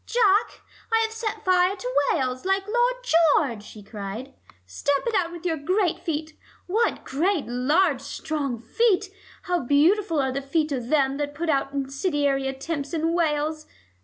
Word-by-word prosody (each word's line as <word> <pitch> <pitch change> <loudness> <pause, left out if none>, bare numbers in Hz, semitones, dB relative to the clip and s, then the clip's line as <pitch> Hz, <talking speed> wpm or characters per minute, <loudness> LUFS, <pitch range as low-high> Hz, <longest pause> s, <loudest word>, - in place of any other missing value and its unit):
"Jack, 430 -3 +2 0.3
I 450 0 +4
have 445 - -2
set 445 -1 -4
fire 365 +1 +3
to - - -5 0.2
Wales, 255 -4 -1
like 385 +1 +1
Lloyd 485 +3 +1
George," 310 - +3
she 210 0 -12
cried. 215 +5 -7 0.3
"Stamp 275 - -1
on 380 -4 +2
it - - -12
with 345 0 -10
your 330 -2 0
great 360 +4 0
feet. 310 -1 -4 0.3
What 440 +6 0
great 330 +4 0
large 275 +5 +1
strong 280 -2 -3
feet! 385 - +1 0.3
How 355 -2 0
beautiful 325 - +2
are 265 -1 +1
the 275 +2 -3
feet 300 +3 -1
of 250 -4 -3
them 275 -1 +2
that 290 0 -3
put 330 +2 -3
out 275 -1 0
incendiary 275 0 0
attempts 280 +2 -4
in 325 +1 0
Wales! 310 -2 0
310 Hz, 160 wpm, -25 LUFS, 275-370 Hz, 0.3 s, I